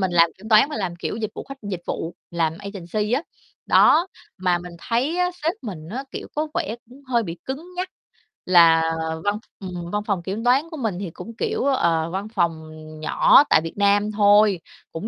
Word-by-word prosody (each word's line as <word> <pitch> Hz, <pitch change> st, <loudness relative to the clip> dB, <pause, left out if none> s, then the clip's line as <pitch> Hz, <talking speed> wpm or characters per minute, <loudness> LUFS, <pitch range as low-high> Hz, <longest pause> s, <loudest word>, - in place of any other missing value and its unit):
mình 190 Hz, -1 st, +1 dB
làm 170 Hz, -1 st, +5 dB
kiểm 210 Hz, +3 st, -10 dB
toán 220 Hz, +5 st, +6 dB
mà -, -, -4 dB
làm 185 Hz, -5 st, -3 dB
kiểu 175 Hz, -, -4 dB
dịch 220 Hz, -2 st, -3 dB
vụ -, -, -7 dB
khách 275 Hz, 0 st, -10 dB
dịch 190 Hz, -4 st, -5 dB
vụ, 165 Hz, -, -4 dB, 0.2 s
làm 165 Hz, -2 st, 0 dB
agency 200 Hz, +2 st, -4 dB
á. 265 Hz, +5 st, +2 dB, 0.4 s
Đó, 335 Hz, +3 st, +5 dB, 0.3 s
mà 180 Hz, -1 st, +1 dB
mình 175 Hz, 0 st, -9 dB
thấy 255 Hz, -, -1 dB
á, 360 Hz, 0 st, +2 dB
sếp 325 Hz, +2 st, +2 dB
mình 175 Hz, -9 st, -7 dB
á, 260 Hz, +5 st, -4 dB
kiểu, -, -, -7 dB
có 305 Hz, +1 st, 0 dB
vẻ 315 Hz, -9 st, -2 dB
cũng 270 Hz, +3 st, -15 dB
hơi 245 Hz, -3 st, +1 dB
bị 170 Hz, -4 st, -6 dB
cứng 315 Hz, +7 st, -6 dB
nhắc, 365 Hz, +1 st, -2 dB, 0.6 s
là 170 Hz, -2 st, +6 dB, 0.4 s
văn 205 Hz, +1 st, 0 dB, 0.2 s
ừm, 180 Hz, -3 st, -6 dB
văn 210 Hz, 0 st, -1 dB
phòng 195 Hz, -5 st, -1 dB
kiểm 195 Hz, +5 st, -4 dB
toán 270 Hz, +6 st, +3 dB
của 320 Hz, -, -6 dB
mình 220 Hz, -9 st, -2 dB
thì 195 Hz, -3 st, -4 dB
cũng 230 Hz, +7 st, -10 dB
kiểu, 250 Hz, -, -1 dB
ờ, 170 Hz, -12 st, +2 dB
văn 195 Hz, +3 st, -3 dB
phòng, 170 Hz, -6 st, 0 dB
ừm, 155 Hz, 0 st, -11 dB
nhỏ 155 Hz, -, +6 dB
tại -, -, +5 dB
Việt 165 Hz, +3 st, -7 dB
Nam 205 Hz, +1 st, +3 dB
thôi, 205 Hz, -2 st, +5 dB, 0.3 s
cũng 165 Hz, +6 st, -5 dB
205 Hz, 210 wpm, -23 LUFS, 175-245 Hz, 0.6 s, toán